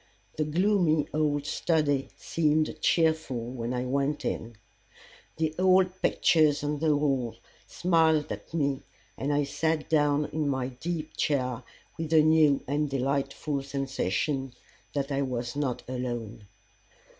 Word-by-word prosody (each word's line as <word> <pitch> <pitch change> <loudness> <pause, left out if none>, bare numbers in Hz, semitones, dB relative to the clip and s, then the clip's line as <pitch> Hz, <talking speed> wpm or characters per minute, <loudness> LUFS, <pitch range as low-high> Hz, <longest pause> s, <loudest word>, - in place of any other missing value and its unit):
The 155 - 0
gloomy 170 -2 +2
old 145 -2 0
study 145 -4 0
seemed 155 -1 +1
cheerful 155 -8 +1
when 120 -2 -4
I 125 0 -2
went 140 +3 -1
in. 115 +1 -3 0.8
The 160 -1 0
old 185 0 +4
pictures 150 -3 +3
on 145 0 -1
the 155 -1 +3
walls 135 -5 0 0.3
smiled 160 -4 +2
at - - -7
me, 140 -4 0 0.3
and 140 +2 -2
I 145 0 +2
sat 160 +2 -1
down 150 -1 +3
in 155 -2 0
my 130 -2 -1
deep 155 +4 -5
chair 125 -4 0 0.4
with 160 -1 -3
a 155 -1 +7
new 155 -3 +4
and 145 +2 0
delightful 140 +2 -1
sensation 135 - -2 0.4
that 140 0 -2
I 140 0 0
was 125 -2 -3
not 140 -4 -2
alone. 120 -4 -5
145 Hz, 135 wpm, -28 LUFS, 135-155 Hz, 0.8 s, a